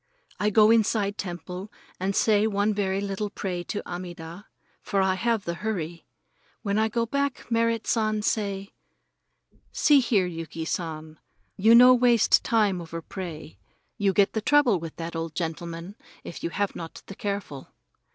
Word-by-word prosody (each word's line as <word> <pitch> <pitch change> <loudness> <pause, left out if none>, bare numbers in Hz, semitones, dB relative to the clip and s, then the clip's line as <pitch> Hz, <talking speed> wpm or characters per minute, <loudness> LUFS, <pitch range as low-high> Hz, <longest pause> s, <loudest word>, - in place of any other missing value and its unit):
I 210 - +2
go 215 +1 +5
inside 210 -2 +2
temple 180 +2 -6 0.3
and 190 +2 -1
say 215 -1 +3
one 205 0 +1
very 195 -1 -1
little 200 +1 -3
pray 185 -3 -4
to 205 - -5
Amida, 175 +1 -8 0.3
for 200 - -1
I 190 -1 +3
have 230 +2 0
the 170 - -2
hurry. 175 -3 -4 0.6
When 200 0 0
I 220 - +3
go 230 +1 0
back, 280 +2 -2
Merrit 230 -1 +1
San 215 -2 +1
he 210 - -2
say: 200 -2 -2 1.0
"See 290 -2 +5
here, 225 -7 +2
Yuki 165 -2 -5
San, 160 -2 -5 0.4
you 220 +4 +5
no 250 +2 +9
waste 240 -2 +4
time 210 -6 +2
over 165 0 -6
pray. 155 - -8 0.4
You 200 -1 +3
get 195 +1 +3
the 220 - -1
trouble 255 -6 +4
with 165 -1 -7
that 165 0 -6
old 165 -1 -4
gentleman 170 +2 -5 0.3
if - - -9
you - - -1
have 200 +4 -2
not 165 -1 -8
the - - -9
careful." 200 -9 -5
200 Hz, 160 wpm, -26 LUFS, 170-220 Hz, 1.0 s, no